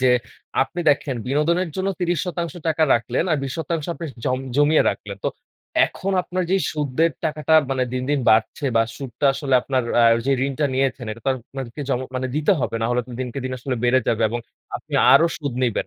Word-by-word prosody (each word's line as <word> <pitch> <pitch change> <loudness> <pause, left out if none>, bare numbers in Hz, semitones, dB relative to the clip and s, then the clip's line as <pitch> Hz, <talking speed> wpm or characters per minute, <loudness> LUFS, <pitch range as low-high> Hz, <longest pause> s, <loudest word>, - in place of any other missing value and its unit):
যে, 130 -1 +4 0.5
আপনি 175 - -5
দেখেন 140 -2 0
বিনোদনের 165 +6 +1
জন্য 190 +1 -1
৩০% 170 -2 -1
রাখলেন 120 +7 0
আর 155 - +3
২০% 155 +3 -3
আপনি 165 - -6 0.2
জম 130 - +1 0.2
জমিয়ে 145 +2 +5
রাখলেন। 100 -1 -7
তো - - +3 0.6
এখন 195 +1 -4
আপনার 185 +1 -2
যেই 190 -2 +2
সুদের 150 +2 +1
টাকাটা 155 0 +1 0.2
মানে 130 -1 +1
দিন, 130 0 -2
দিন 145 - +2
বাড়ছে 110 +6 +2
বা 115 - +5
সুদটা 135 0 -2
আসলে 135 -3 -1
আপনার 130 -2 0 0.2
আ - - +6 0.2
যে 140 - +3
ঋণটা 140 +2 0
নিয়েছেন 130 -2 0
এটা 115 - -11
তো - - +1
আর 130 - -3
আপনাকে 135 0 -6
জম 125 - +1 0.2
মানে 130 - -1
দিতে 155 +6 +3
হবে 115 - -1
না 115 - +2
হলে 120 0 +1
তো - - -12
দিনকে 130 +1 -4
দিন 130 - -3
আসলে 125 +1 -3
বেড়ে 130 +2 +4
যাবে 115 0 +1
এবং 120 +2 -3 0.4
আপনি - - -10 0.2
আরও 165 - +7
সুদ 145 -5 -4
নিবেন। 120 -4 0
140 Hz, 195 wpm, -22 LUFS, 125-160 Hz, 0.6 s, আরও